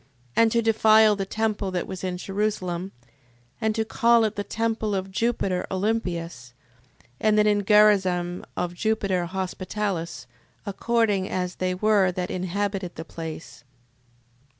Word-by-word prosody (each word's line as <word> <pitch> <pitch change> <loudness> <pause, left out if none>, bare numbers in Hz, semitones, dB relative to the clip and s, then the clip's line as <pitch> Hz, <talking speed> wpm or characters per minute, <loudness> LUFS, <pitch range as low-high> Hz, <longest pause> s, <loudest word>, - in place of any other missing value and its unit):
And 230 -1 +4
to 235 0 +2
defile 220 -1 +5
the 195 -1 -3
temple 215 -2 -1
that 180 -1 -2
was 190 -1 -7
in 180 -1 -2
Jerusalem, 190 -2 -2 0.7
and 220 -1 +1
to 220 -1 0
call 235 +1 +3
it 215 - 0
the 205 - -2
temple 225 -1 -1
of 190 0 -3
Jupiter 195 -3 -1
Olympius: 175 - -2 0.7
and 215 -1 +3
that 210 - +5
in 205 -1 +3
Garazim 190 -4 +3
of 175 -1 -2
Jupiter 195 -3 0
Hospitalis, 185 - -3 0.4
according 205 -1 0
as 180 -1 -3
they 185 0 -1
were 200 -1 +3
that 180 0 -3
inhabited 190 0 -3
the 160 - -7
place. 160 -1 -8
195 Hz, 135 wpm, -25 LUFS, 180-215 Hz, 0.7 s, defile